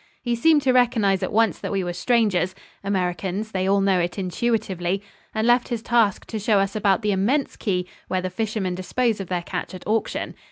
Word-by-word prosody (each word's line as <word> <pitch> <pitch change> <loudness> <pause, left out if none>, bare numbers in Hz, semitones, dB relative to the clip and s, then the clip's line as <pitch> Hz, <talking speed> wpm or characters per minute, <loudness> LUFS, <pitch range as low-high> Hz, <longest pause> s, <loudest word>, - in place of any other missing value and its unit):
He 240 - 0
seemed 295 +4 +4
to 265 - +4
recognize 220 -6 +3
at 185 - -2
once 220 -5 +2
that - - -4
we 195 -2 0
were 175 0 -3
strangers 190 -2 +1 0.3
Americans, 195 +2 -2
they 190 -1 0
all 200 0 +3
know 195 -2 +3
it 175 +2 -2
intuitively 195 -1 -1 0.3
and 220 0 -1
left 240 +1 +4
his 235 -3 -3
task 230 -5 +2
to 220 - -5
show 210 0 +2
us 195 +1 0
about 205 0 +2
the 210 - +2
immense 235 +9 +1
quay 180 -4 -1 0.2
where 185 - 0
the 185 0 -3
fishermen 215 -4 -2
dispose 220 +5 -1
of 195 - -5
their 175 -1 -2
catch 185 - -5
at 185 - -10
auction. 220 +1 -1
200 Hz, 205 wpm, -23 LUFS, 185-225 Hz, 0.3 s, seemed